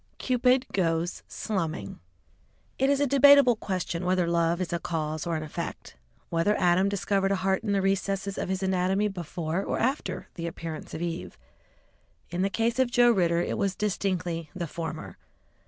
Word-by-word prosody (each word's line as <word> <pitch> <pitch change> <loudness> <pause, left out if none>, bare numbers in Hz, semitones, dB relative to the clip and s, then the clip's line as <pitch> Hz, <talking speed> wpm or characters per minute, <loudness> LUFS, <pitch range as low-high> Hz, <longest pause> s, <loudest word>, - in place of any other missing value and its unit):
CUPID 255 0 +2
GOES 170 -2 0
SLUMMING 165 - -3 0.8
It 270 +1 +3
is 280 0 +3
a 285 - +3
debatable 280 -2 +7
question 185 -4 -3
whether 180 0 +2
love 170 0 +1
is 180 -2 -3
a 170 - 0
cause 155 -1 -3
or 170 - 0
an 155 - -3
effect, 155 - -6 0.4
whether 170 +5 +2
Adam 180 +2 +3
discovered 195 0 0
a - - +3
heart 190 0 0
in 210 - -1
the 195 -1 +1
recesses 195 0 0
of - - -3
his 190 0 -1
anatomy 190 +2 +1
before 170 -1 -3
or - - -2
after 235 -7 -1
the 170 0 -5
appearance 165 -1 -6
of 165 - -4
Eve. 130 - -5 0.9
In 175 +1 -1
the 195 - +2
case 230 +4 0
of 260 -2 +3
Joe 240 0 +5
Ridder 170 -5 +2
it - - -3
was 195 -1 0
distinctly 180 -6 -2
the 175 -2 -3
former. 155 - -6
185 Hz, 170 wpm, -27 LUFS, 170-205 Hz, 0.9 s, debatable